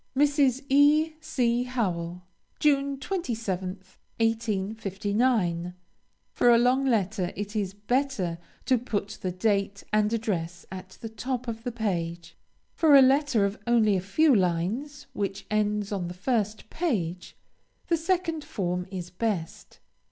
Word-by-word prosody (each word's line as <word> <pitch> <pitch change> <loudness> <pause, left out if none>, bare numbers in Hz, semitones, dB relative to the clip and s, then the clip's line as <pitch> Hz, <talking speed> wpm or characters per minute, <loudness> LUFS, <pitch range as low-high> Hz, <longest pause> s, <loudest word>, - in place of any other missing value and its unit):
MRS. 280 -2 +3
E. 295 +3 +4
C. 245 -6 0
HOWELL. 180 -8 -2 0.4
June 280 -2 +2
27th, 205 - -4 0.2
1859. 205 -3 0 0.6
For 245 - +3
a 235 - +7
long 255 +3 +3
letter, 200 -5 0
it 205 +2 -5
is 195 -2 -2
better 210 -6 -1 0.3
to 255 -2 +3
put 205 -4 -4
the 185 - -2
date 200 +1 0
and 215 0 +3
address 175 -7 -2
at 190 0 -9
the 225 - -5
top 250 +3 -4
of 225 -1 -4
the 245 - -3
page. 175 -7 -3 0.4
For 310 -3 +5
a 275 - +10
letter 270 -5 +3
of 200 +1 -3
only 225 -4 +4
a 185 - 0
few 285 - +3
lines, 200 - 0
which 195 -1 -3
ends 210 -1 0
on 190 -4 -2
the 175 - -7
first 215 +1 -2
page, 185 - -2 0.5
the 340 - +2
second 330 -2 -1
form 180 -5 -3
is 180 -2 -6
best. 185 -4 -3
215 Hz, 135 wpm, -27 LUFS, 190-260 Hz, 0.6 s, a